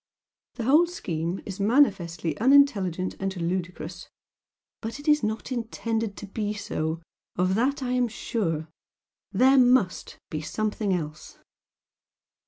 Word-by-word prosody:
The 235 - -4
whole 300 +8 +5
scheme 170 - -3
is 195 -1 -6
manifestly 190 - +2
unintelligent 215 - +4
and 195 -1 -3
ludicrous, 180 0 -4 0.7
but 230 +4 -5
it 290 - -11
is 300 0 +5
not 220 +3 -3
intended 225 -3 -2
to - - -7
be 210 +1 -3
so 160 -5 -3 0.3
of 185 +1 +1
that 260 +6 +1
I 250 - -2
am 250 -1 +2
sure. 165 -8 -2 0.6
THERE 260 +6 +5
MUST 245 -7 +2
BE 155 - -3
SOMETHING 210 +2 -1
ELSE!" 155 -2 -6
205 Hz, 125 wpm, -26 LUFS, 180-245 Hz, 0.7 s, whole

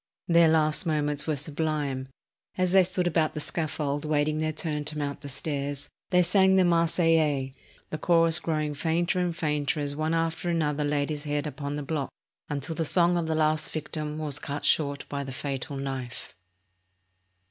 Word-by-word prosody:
Their 170 -1 +6
last 155 +2 +3
moments 150 -2 0
were 155 - +1
sublime. 145 -2 -2 0.5
As 185 -1 +2
they 190 0 +7
stood 180 0 0
about 160 -2 +1
the - - -2
scaffold 150 -2 -1
awaiting 155 0 +1
their 155 0 0
turn 150 -1 -2
to 150 - -2
mount 140 -1 -3
the 145 - -7
stairs, 140 0 -3 0.2
they 180 -1 +4
sang 190 +1 +4
the 190 -1 +5
Marseillaise, 165 -5 +2 0.4
the 155 - -3
chorus 165 0 +4
growing 155 -3 -1
fainter 170 +4 0
and 175 -2 0
fainter 150 -1 0
as 145 -1 -2
one 155 +2 0
after 165 +1 -1
another 150 -3 0
laid 145 0 0
his 150 0 -4
head 145 0 -1
upon 145 -1 -4
the 150 - -4
block 140 -1 -2 0.4
until 145 +2 -2
the 165 +1 -1
song 175 +2 +3
of 170 -2 0
the 160 - 0
last 155 0 +1
victim 155 -1 -4
was 150 -3 -1
cut 145 +1 -5
short 140 -2 +1
by 140 0 -3
the 135 - -7
fatal 140 +1 -4
knife. 135 -3 -5
155 Hz, 180 wpm, -27 LUFS, 145-165 Hz, 0.5 s, they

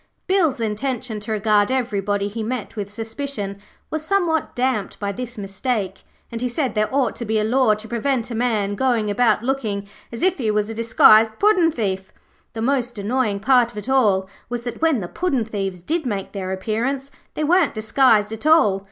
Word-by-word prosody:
Bill's 340 -9 +2
intention 230 +1 -3
to 210 +2 -5
regard 210 -1 +2
everybody 205 -6 -1
he 220 +3 -5
met 225 0 -4
with 205 -2 -4
suspicion 220 -2 -5 0.3
was 315 -1 -2
somewhat 335 -3 0
damped 245 -5 -1
by 200 -1 -2
this 245 +3 -7
mistake, 200 0 -3 0.3
and 230 0 -4
he 250 - 0
said 260 +1 -1
there 215 -1 +1
ought 265 -4 +1
to - - -4
be 220 -1 0
a 210 - +1
law 230 -1 +3
to 215 +1 -10
prevent 240 +1 -1
a - - -3
man 220 -4 0
going 225 -2 +1
about 225 0 +2
looking 220 -6 -2 0.2
as 235 - -5
if 370 -3 +2
he 225 -4 0
was 210 +1 0
a - - -4
disguised 220 -1 +5
puddin' 395 -5 +4
thief. 195 -8 -3 0.4
The 225 0 -4
most 245 -2 0
annoying 205 -1 -1
part 245 +1 +4
of 220 - -14
it 210 +5 -6
all 205 -8 +3 0.2
was 240 -1 -4
that 240 +2 -6
when 320 -8 +2
the 175 - -4
puddin' 270 - -1
thieves 195 -4 -4
did 315 - -2
make 200 -4 -3
their 190 -2 -4
appearance 240 +8 -2 0.2
they 310 - -1
weren't 330 -2 +3
disguised 215 -1 +3
at 225 +7 -4
all. 260 -12 +5
225 Hz, 195 wpm, -21 LUFS, 210-265 Hz, 0.4 s, disguised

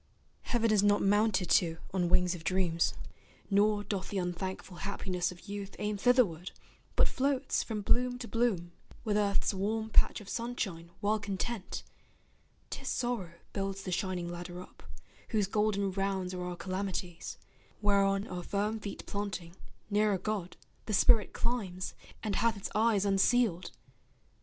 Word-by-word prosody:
Heaven 230 -2 +1
is 210 -2 +5
not 205 0 +4
mounted 205 -2 +3
to 165 0 +4 0.2
on 180 -2 +1
wings 180 0 +4
of 170 -3 -7
dreams, 170 -1 +1 0.6
Nor 205 +1 +4
doth 195 -2 -3
the 200 - -2
unthankful 180 0 -3
happiness 185 -2 -2
of 180 +3 -13
youth 200 -1 -5
Aim 210 0 -1
thitherward, 200 -7 +3 0.4
but - - +5
floats 275 0 +1
from 215 -3 -3
bloom 245 +4 +2
to 245 -1 -6
bloom, 220 -8 0 0.3
With 210 -2 0
earth's 205 0 +2
warm 220 +3 -1
patch - - +4
of 210 - -12
sunshine 200 -8 -3
well 215 +1 +2
content 200 +1 -3 0.9
'Tis - - -5
sorrow 235 -9 -1 0.2
builds 195 -1 -2
the 185 - -4
shining 180 -1 -1
ladder 175 +1 -6
up, 180 - -12 0.5
Whose 210 -3 +2
golden 200 -1 +1
rounds 190 -1 -1
are 180 0 -3
our 180 0 -3
calamities, 185 -1 -4 0.4
Whereon 200 -1 +3
our 180 -1 -4
firm 210 +4 -1
feet 205 -1 -6
planting, 185 -4 -4 0.4
nearer 205 -1 +3
God 190 -3 -3 0.3
The 215 - -1
spirit 215 +2 +5
climbs, 200 -7 -2 0.3
and 210 -3 0
hath 230 -2 +2
its 195 - -5
eyes 215 -1 +3
unsealed. 195 -1 +3
200 Hz, 145 wpm, -32 LUFS, 185-215 Hz, 0.9 s, is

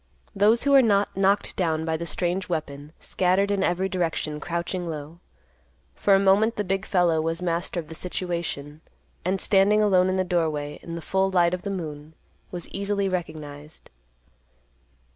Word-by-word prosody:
Those 210 +4 +4
who 280 - +2
were 275 -1 +8
not 205 -4 +2
knocked 195 +1 +1
down 160 -3 0
by 160 0 0
the 170 +1 -4
strange 180 +2 -2
weapon 150 -3 -4
scattered 190 +2 +1
in 195 -1 +1
every 180 +2 +1
direction, 165 -5 -2
crouching 170 +2 -3
low. 155 +1 -7 0.7
For 195 - +3
a - - +4
moment 200 +4 +3
the 210 - -1
big 195 +1 -2
fellow 175 -4 +2
was 165 +1 -2
master 175 0 -2
of 160 - -7
the 160 - -9
situation, 170 -4 -4 0.4
and, 190 +2 0
standing 200 +2 +4
alone 185 -3 +4
in 185 - 0
the 190 - +1
doorway, 160 -5 -1
in 170 - -7
the 170 - -6
full 190 0 +1
light 175 -2 +3
of 180 - -2
the 200 - -4
moon, 155 -4 -6 0.3
was 175 -2 -6
easily 200 0 -1
recognized. 155 -4 -6
180 Hz, 170 wpm, -25 LUFS, 160-195 Hz, 0.7 s, were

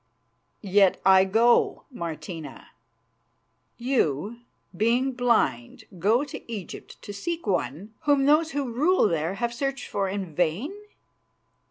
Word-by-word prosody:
"Yet 195 -1 +3
I 190 0 +6
go, 230 +5 +3
Martina." 170 - -7 1.1
"You, 235 - -1 0.4
being 235 +7 +2
blind, 235 - 0 0.2
go 220 - +3
to 285 - -9
Egypt 200 -6 -8
to 205 - -7
seek 335 +12 -4
one 185 - -2
whom 285 -2 +3
those 305 +3 +4
who 280 -5 -3
rule 310 +4 +3
there 165 +1 -1
have 235 +3 -2
searched 270 +1 -3
for 195 -1 -1
in 190 -4 -5
vain. 180 - -1
215 Hz, 120 wpm, -25 LUFS, 185-260 Hz, 1.1 s, I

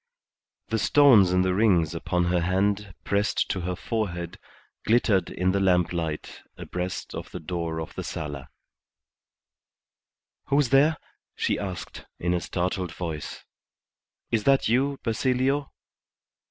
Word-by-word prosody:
The 110 - 0
stones 115 -6 +6
in 90 0 +3
the 95 0 +1
rings 90 -6 +3
upon 90 +1 -1
her 90 0 +1
hand 95 +2 0
pressed 100 +1 0
to 95 - -2
her 90 +1 -2
forehead 85 -6 -3 0.4
glittered 110 -4 +2
in 90 +1 0
the 100 - +1
lamplight 90 -4 0 0.2
abreast 90 0 -5
of - - -6
the 90 - -7
door 85 0 -3
of 80 - -6
the - - -5
sala. 75 -3 -6 2.0
"Who's 140 -2 +2
there?" 145 +4 +4 0.4
she - - 0
asked, 95 -3 -6
in 85 +1 -1
a 90 - 0
startled 90 0 -2
voice. 80 -4 -6 0.9
"Is 110 -2 +1
that 135 -1 +4
you, 135 +5 +1
Basilio?" 130 +4 0
95 Hz, 125 wpm, -26 LUFS, 85-115 Hz, 2.0 s, stones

